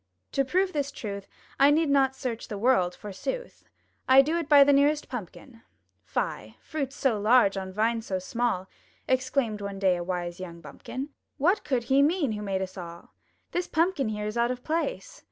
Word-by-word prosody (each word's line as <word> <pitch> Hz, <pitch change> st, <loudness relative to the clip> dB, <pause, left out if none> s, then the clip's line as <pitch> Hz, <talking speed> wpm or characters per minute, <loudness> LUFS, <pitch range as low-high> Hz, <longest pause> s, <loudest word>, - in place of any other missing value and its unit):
To 275 Hz, -, +2 dB
prove 370 Hz, +7 st, +1 dB
this 285 Hz, -2 st, -1 dB
truth 200 Hz, -3 st, -6 dB, 0.3 s
I 275 Hz, -, +7 dB
need 315 Hz, +2 st, +3 dB
not 270 Hz, -1 st, +3 dB
search 235 Hz, -4 st, -4 dB
the 210 Hz, -, -5 dB
world, 200 Hz, -6 st, +2 dB
forsooth! 355 Hz, -, -6 dB, 0.4 s
I 265 Hz, +1 st, +8 dB
do 310 Hz, +4 st, -1 dB
it 330 Hz, -2 st, -5 dB
by 285 Hz, -2 st, +9 dB
the 285 Hz, 0 st, +4 dB
nearest 290 Hz, +2 st, +3 dB
Pumpkin! 230 Hz, +1 st, -8 dB, 0.4 s
*'Fie! -, -, -3 dB
fruit 285 Hz, -4 st, -4 dB
so 265 Hz, -6 st, 0 dB
large 215 Hz, -1 st, +4 dB
on 190 Hz, -1 st, -4 dB
vine 225 Hz, +3 st, +1 dB
so 195 Hz, -4 st, -3 dB
small!*' 190 Hz, 0 st, -1 dB, 0.4 s
Exclaimed 260 Hz, -4 st, 0 dB
one 200 Hz, -1 st, -5 dB
day 190 Hz, -2 st, +3 dB
a 175 Hz, -, -4 dB
wise 175 Hz, -1 st, -4 dB
young 170 Hz, -2 st, -8 dB
bumpkin! 260 Hz, -, -7 dB, 0.3 s
"What 365 Hz, +9 st, +2 dB
could 255 Hz, -5 st, 0 dB
He 270 Hz, +3 st, +3 dB
mean 300 Hz, -3 st, +2 dB
who 210 Hz, -1 st, -4 dB
made 195 Hz, -2 st, -1 dB
us 185 Hz, 0 st, -7 dB
all? 170 Hz, -1 st, -10 dB, 0.4 s
This 355 Hz, 0 st, -1 dB
Pumpkin 320 Hz, -6 st, +1 dB
here 210 Hz, -1 st, -3 dB
is 210 Hz, +2 st, -3 dB
out 235 Hz, 0 st, +2 dB
of 250 Hz, 0 st, -4 dB
place. 335 Hz, +10 st, -3 dB
245 Hz, 190 wpm, -27 LUFS, 200-280 Hz, 0.4 s, by